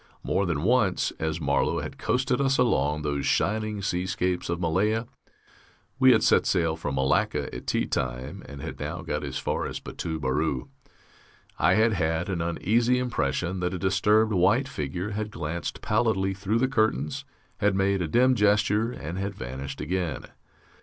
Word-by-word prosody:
More 100 -1 0
than 75 -3 -1
once, 110 -4 +2
as 80 +1 -2
Marlow 70 -3 +1
had - - -7
coasted 130 +1 +1
us 135 0 +2
along 75 - +1
those 70 -2 -1
shining 105 -1 0
seascapes 90 -1 -1
of 85 0 -1
Malaya 105 +7 +1 0.9
we 130 -1 +7
had - - +4
set - - +4
sail 80 -3 +1
from 75 -4 -4
Malacca 65 0 +1
at - - -8
tea - - +1
time, 65 0 -3
and 70 -1 -9
had - - -6
now 80 +5 -4
got 75 -3 -3
as 70 -3 -4
far - - -2
as - - -5
Batu 80 -2 -5
Beru 70 -1 -1 0.9
I - - +4
had 110 +1 +4
had 80 -1 0
an 90 -3 -1
uneasy 115 +9 +1
impression 90 - -1
that 90 +1 -1
a - - -2
disturbed 105 +4 +3
white 90 -2 +3
figure 90 +8 -4
had 105 +1 -3
glanced 85 -3 -4
pallidly 105 -3 +1
through 100 +3 -1
the 130 +3 +2
curtains, 110 - 0 0.3
had 105 -1 +2
made 95 0 +1
a 85 - -1
dim 125 +10 +4
gesture, 105 +1 +2
and 85 - -6
had 100 0 -3
vanished 70 +1 -6
again.... 85 -3 -2
90 Hz, 165 wpm, -26 LUFS, 80-105 Hz, 0.9 s, we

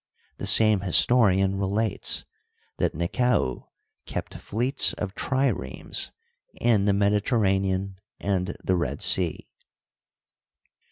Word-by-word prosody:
The 100 - -4
same 105 +1 +5
historian 95 0 +3
relates 105 +3 +1 0.5
that - - -1
Nekau 85 - -1 0.4
kept - - -6
fleets 125 +6 0
of 100 -2 -5
triremes 135 +3 -2 0.5
in 110 -5 +2
the 100 - +3
Mediterranean 100 -2 0 0.2
and 90 -2 -2
the 95 - 0
Red 85 - -3
Sea. 85 -5 +1
100 Hz, 95 wpm, -25 LUFS, 95-110 Hz, 0.5 s, same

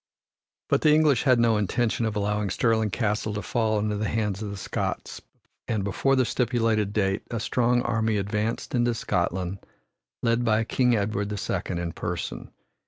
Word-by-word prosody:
But - - +2
the 155 - +5
English 150 -6 +4
had 130 -2 +5
no 115 -2 +4
intention 115 +2 0
of 110 - -3
allowing 105 0 0
Stirling 110 +2 +1
Castle 105 -1 -1
to 105 - -3
fall 110 -3 0
into 105 0 -1
the 105 +1 -1
hands 105 -2 -1
of 105 - -4
the 100 - -6
Scots - - -4 0.5
and 105 -3 -1
before 135 +7 +1
the 130 -1 +3
stipulated 115 -4 +1
date 95 -2 0
a 115 - -3
strong 120 +2 +1
army 110 -2 0
advanced 105 +3 -2
into 120 -1 +2
Scotland, 95 -3 -1 0.6
led 115 +1 +2
by 110 -1 +2
King 125 +1 +2
Edward 105 -1 -1
the 105 - -3
Second 90 -2 -2
in 85 -1 -3
person. - - -5
110 Hz, 170 wpm, -26 LUFS, 105-120 Hz, 0.6 s, the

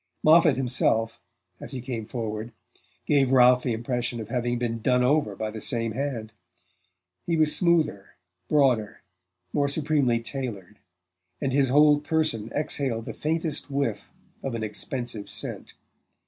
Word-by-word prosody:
Moffatt 160 -1 +6
himself, 120 -3 +1 0.4
as - - -6
he 130 - -4
came 120 -3 -5
forward, 115 -1 -5 0.5
gave 140 -3 +3
Ralph 125 -1 +6
the 125 - -1
impression 120 +1 -3
of 110 -1 -7
having 120 0 -1
been 115 -1 -3
done 125 +1 +2
over 130 -6 +1
by 110 +2 -4
the 110 0 -7
same 115 -2 0
hand: 120 -3 -4 0.9
he 170 -1 +1
was 155 -1 +5
smoother, 165 - +1 0.3
broader, 130 -8 +1 0.5
more 140 -1 +2
supremely 140 -5 +1
tailored, 115 -5 -5 0.6
and 135 -3 -2
his 135 -1 +3
whole 145 +2 +5
person 145 -8 -1
exhaled 135 -6 -1
the - - -6
faintest 160 -1 -3
whiff 140 -6 -2 0.4
of 135 -3 -4
an 115 - -3
expensive 110 0 -4
scent. - - -5
125 Hz, 140 wpm, -26 LUFS, 115-145 Hz, 0.9 s, Moffatt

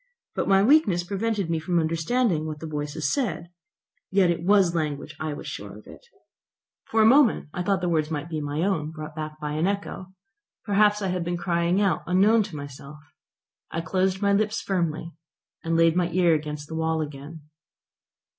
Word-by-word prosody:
But - - -2
my 195 0 +5
weakness 215 - +4
prevented 200 +1 -2
me 165 - 0
from 175 +2 -1
understanding 165 +2 +1
what 155 -1 -6
the 160 - -7
voices 150 0 -2
said. 195 - -2 0.6
Yet 190 -2 +3
it 170 - -2
was 190 -1 +4
language, 150 -4 -3
I 155 -1 -3
was - - -8
sure - - -7
of - - -15
it. - - -14 0.9
For 220 0 +3
a - - +5
moment 245 - +4
I 180 - -3
feared 190 0 0
the 180 - 0
words 155 -2 +1
might 155 0 -3
be 160 -2 -4
my 145 +2 -2
own, 165 -6 0
brought 155 -1 -8
back 155 -1 -6
by 150 +1 -3
the 175 - +2
echo. 200 -2 -4 0.6
Perhaps 210 0 +3
I 190 - 0
had 180 -1 -1
been 175 +1 -2
crying 170 +1 +1
out 195 -6 +1
unknown 200 +6 +4
to 190 -6 -9
myself. 140 0 -9 0.7
I 165 - -3
closed 190 +4 0
my 200 0 +3
lips 215 +2 +1
firmly, 170 -3 -2 0.5
and 165 0 0
laid 165 0 +4
my 175 -1 +1
ear 175 -1 +3
against 150 -1 -3
the 160 - -7
wall 160 0 0
again. 150 +2 -7
170 Hz, 190 wpm, -25 LUFS, 155-195 Hz, 0.9 s, my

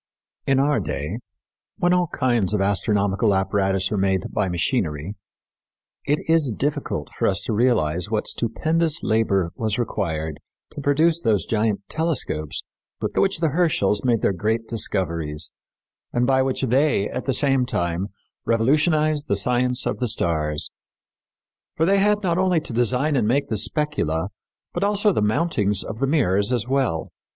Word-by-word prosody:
In 135 -1 +3
our 145 +1 +2
day, 75 +8 -4 0.6
when 175 0 +2
all 180 -1 +2
kinds 120 -9 0
of - - 0
astronomical 100 +1 +1
apparatus 95 0 0
are 105 - 0
made 95 -1 0
by 105 -3 0
machinery, 85 - -1 0.9
it 145 +3 -1
is 160 -5 +3
difficult 140 - -3
for - - 0
us 95 - 0
to 115 - -2
realize 95 -7 +1
what 110 -1 -1
stupendous 160 +7 0
labor 100 -6 +1
was 110 -1 -1
required 80 -10 -3 0.3
to 145 - -7
produce 155 +4 +2
those 105 - +1
giant 110 -2 0
telescopes 155 - -2 0.4
with - - -3
which 195 -3 +2
the 165 - +2
Herschels 140 - +1
made 120 -4 +2
their - - +2
great 110 +5 -1
discoveries 85 -8 -1 0.6
and 120 0 +1
by 130 0 +3
which 130 0 -1
they, 130 -4 +2
at - - -5
the 135 - 0
same 135 -3 +2
time, 85 -1 -1 0.4
revolutionized 150 +5 +2
the 100 - +1
science 125 +4 +1
of - - -2
the 125 - 0
stars. 80 -6 -1 1.1
For 160 - +3
they 195 +2 +3
had 210 +1 +2
not 175 -1 +1
only 185 -3 +2
to 125 - -6
design 125 +6 +1
and 120 -5 +1
make 140 +4 +1
the 110 - -1
specula, 100 - 0 0.4
but 175 - -2
also 205 +1 +2
the - - 0
mountings 105 - +1
of 110 - -7
the 135 - +1
mirrors 105 - +2
as 120 -2 0
well. 130 -12 -1
115 Hz, 160 wpm, -22 LUFS, 95-145 Hz, 1.1 s, In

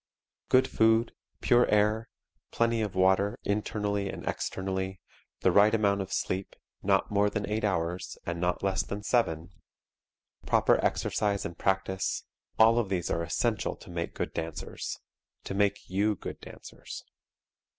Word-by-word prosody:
Good 130 +1 +5
food, 115 +1 +3 0.3
pure 120 0 +4
air, 105 +2 +2 0.4
plenty 115 -1 +1
of 105 -3 -3
water, 95 +2 +3
internally 100 -1 -1
and - - -7
externally, 95 0 -3 0.4
the 95 - +4
right 105 +4 +5
amount 100 -2 +2
of 95 0 -6
sleep, 95 +1 -2 0.3
not - - +2
more 105 0 +3
than 105 -1 -3
eight 105 +1 -1
hours, 90 -3 -1
and 85 0 -3
not 90 +1 0
less 95 -1 +1
than 100 +1 -5
seven, 90 -7 0 1.0
proper - - +3
exercise 100 -1 0
and 85 - -5
practice 95 +1 -1 0.3
all 115 +1 +6
of 110 -5 -1
these 90 -3 -1
are 85 - 0
essential 85 - -1
to - - -13
make 85 -1 -4
good - - -3
dancers 80 -1 -5 0.5
to - - -5
make 100 0 +1
you 100 +3 +1
good - - -7
dancers. - - -10
100 Hz, 145 wpm, -29 LUFS, 95-105 Hz, 1.0 s, all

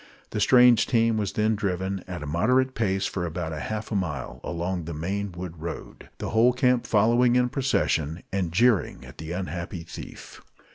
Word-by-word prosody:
The - - -2
strange 125 -2 +6
team 115 -2 +2
was 105 -3 -2
then 110 +1 +2
driven, 95 -1 -2
at 90 -4 -6
a - - -5
moderate 125 - +2
pace, 95 -5 0
for 90 - -3
about 85 -1 -3
half 105 +9 -4
a - - -1
mile 75 -9 -3
along 85 0 -3
the 85 -1 -5
main 100 +5 -3
wood 85 -2 -8
road, 85 0 -7
the - - -4
whole 115 +3 +4
camp 125 -1 +2
following 120 +3 +4
in 125 0 +3
procession, 85 - 0
and 95 -4 -1
jeering 115 +2 +2
at - - -14
the 80 +1 -6
unhappy 90 -1 -4
thief. 80 - -10
95 Hz, 180 wpm, -26 LUFS, 85-115 Hz, -, strange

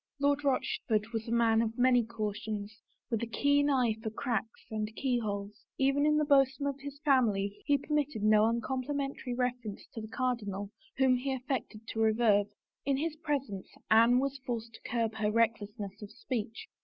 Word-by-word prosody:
Lord 285 +1 +2
Rochford 230 -5 0
was 225 0 -3
a - - -4
man 230 -1 +4
of 230 0 -2
many 245 -1 +5
cautions, 215 -1 -4 0.4
with 225 - 0
a 235 - -2
keen 285 +5 +2
eye 250 -5 +2
for 220 - -3
cracks 225 0 -3
and 215 -1 -2
keyholes; 210 -5 -2
even 275 +2 +3
in 300 0 +4
the 305 - +2
bosom 275 -1 +3
of 280 -1 -2
his 285 0 -7
family 210 -8 +2
he 285 -1 +4
permitted 295 -6 -1
no 215 0 +5
uncomplimentary 260 +2 -2
refer 250 0 +1
ence 205 -3 -7
to 225 - -5
the 215 - -7
cardinal 210 -5 -2 0.3
whom 260 -1 +4
he 270 +2 -2
affected 245 -4 -4
to 225 - -4
revere. 220 -2 +4 0.4
In 275 -1 +1
his 310 +2 -2
presence 275 - -3 0.2
Anne 230 +3 +6
was 275 +1 -1
forced 230 -3 -4
to - - -11
curb 230 -2 0
her 210 -1 +1
recklessness 210 -2 -1
of 210 - -7
speech. 225 0 -5
235 Hz, 175 wpm, -31 LUFS, 215-270 Hz, 0.4 s, Anne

